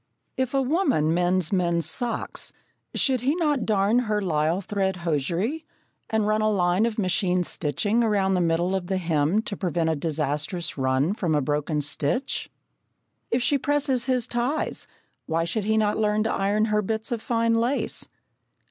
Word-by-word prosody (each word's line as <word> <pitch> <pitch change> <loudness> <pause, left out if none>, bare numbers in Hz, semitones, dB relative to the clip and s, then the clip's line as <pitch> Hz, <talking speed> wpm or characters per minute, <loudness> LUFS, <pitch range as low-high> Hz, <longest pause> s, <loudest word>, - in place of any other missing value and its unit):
If 260 0 -1
a 270 - +3
woman 265 - +2
mends 180 0 +1
men's 170 -3 +2
socks, 240 -3 -3 0.4
should 260 -4 +1
he 275 +5 +1
not 300 -6 0
darn 210 +2 +3
her 215 -4 0
lisle 165 -2 0
thread 195 -1 -1
hosiery, 175 - -1 0.5
and 220 -1 +1
run 215 +1 +1
a 215 - +2
line 185 +1 +2
of 225 - -4
machine 185 -2 +1
stitching 175 - 0
around 200 -4 +2
the 180 - +2
middle 170 +2 +1
of 180 -2 -3
the 190 0 0
hem 165 +3 +1
to 205 - -4
prevent 170 -3 0
a - - 0
disastrous 155 +3 -2
run 130 +5 +1
from 175 -7 -1
a - - +3
broken 150 +2 -1
stitch? 145 - -1 0.8
If 240 +1 +1
she 285 +1 +2
presses 270 -3 +1
his 250 -3 +1
ties, 245 +6 -1 0.4
why 165 0 0
should 200 +5 -2
he 220 +1 +2
not 210 -1 +1
learn 210 0 +2
to 220 - -1
iron 205 +2 +1
her 210 - +3
bits 220 +4 -3
of 235 -2 -2
fine 230 -1 +1
lace? 250 +4 0
200 Hz, 170 wpm, -25 LUFS, 170-230 Hz, 0.8 s, a